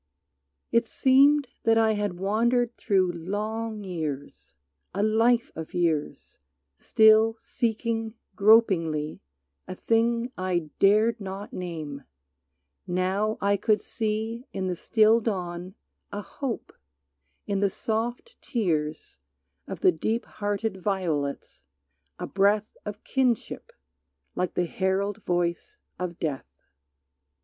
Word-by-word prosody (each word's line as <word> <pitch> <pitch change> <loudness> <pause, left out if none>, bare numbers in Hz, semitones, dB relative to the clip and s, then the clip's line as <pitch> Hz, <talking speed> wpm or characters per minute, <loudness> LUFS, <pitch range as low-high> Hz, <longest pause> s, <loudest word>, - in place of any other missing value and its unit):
It 230 0 +3
seemed 280 +3 +4 0.2
that 225 0 +3
I 225 -1 +4
had 205 -4 -2
wandered 235 +5 +1
through 190 -4 +2
long 210 +5 -4
years, 150 - -6 0.4
A 200 - +1
life 230 +2 +3
of 160 +3 -7
years, 165 -4 -1 0.4
still 220 - +5
seeking 225 -1 -2 0.2
gropingly 180 -8 +3 0.5
A 185 - -6
thing 230 +3 +1
I 175 -4 -2
dared 215 +3 +4
not 195 +1 -6
name; 155 -6 -5 0.8
now 190 +4 0
I 200 0 +2
could 215 +2 +2
see 225 +2 -3
In 190 -1 -3
the 180 -1 -1
still 220 +4 +4
dawn 180 -3 -4 0.4
a 205 - -4
hope, 260 0 -5 0.7
in 200 -1 -1
the 200 0 +2
soft 235 - -3
tears 155 - -2 0.5
Of - - -6
the 185 - +6
deep 220 +8 -2
hearted 205 -1 -3
violets 165 -8 -2 0.5
a - - -4
breath 205 +2 +1
Of 210 0 -6
kinship, 260 - -1 0.6
like 180 -1 -2
the 180 - +1
herald 195 +3 -1
voice 175 - -1 0.2
of 180 -2 -4
Death. 145 -5 -3
205 Hz, 110 wpm, -26 LUFS, 180-225 Hz, 0.8 s, the